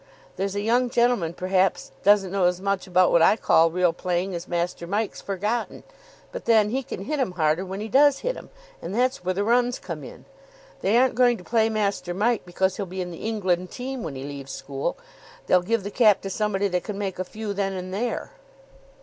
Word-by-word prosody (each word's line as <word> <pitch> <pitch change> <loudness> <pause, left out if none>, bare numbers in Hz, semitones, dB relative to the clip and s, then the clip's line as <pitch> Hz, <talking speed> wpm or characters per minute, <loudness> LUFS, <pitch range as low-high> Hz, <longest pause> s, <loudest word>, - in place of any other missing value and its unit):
There's 195 +1 -2
a 205 - -1
young 240 +4 +2
gentleman, 235 -9 +1
perhaps, 185 +1 0
doesn't 200 -2 +4
know 195 -2 +1
as 180 0 +2
much 195 0 -1
about 185 0 +4
what 170 - +5
I 165 - +6
call 165 -6 +4
real 175 0 +2
playing 180 +2 -2
as 170 +1 -5
Master 170 0 -2
Mike's 205 +3 -2
forgotten; 205 +5 -3 0.5
but - - -7
then 220 -2 +4
he 265 +3 0
can 270 - -7
hit 300 0 -2
'em 245 -9 0
harder 160 0 +1
when 190 +2 -6
he 215 - -4
does 275 +4 +4
hit - - 0
'em, - - -11 0.3
and 195 - -5
that's 250 -4 +1
where 185 0 -1
the 200 - 0
runs 245 +2 +2
come - - -7
in. - - -11 0.6
They 205 +5 +3
aren't 255 +1 +4
going 245 0 +3
to 180 - -13
play 225 +2 +2
Master 200 -5 -1
Mike 220 0 0
because 190 +1 0
he'll 200 -3 -3
be 185 +1 -5
in 180 -1 -5
the 170 - -6
England 185 -5 0
team 260 0 -5
when 155 -8 -5
he 130 - -6
leaves 140 -1 -7
school. 135 0 -4 0.5
They'll 180 - +4
give 220 +3 0
the 205 - -5
cap 215 -3 +4
to 195 - -5
somebody 205 -1 0
that 180 -1 -1
can 210 -2 -5
make 195 -3 -4
a - - 0
few 210 +2 -5
then 195 -1 -1
and 185 0 -6
there." 230 +4 -3
195 Hz, 220 wpm, -24 LUFS, 180-225 Hz, 0.6 s, I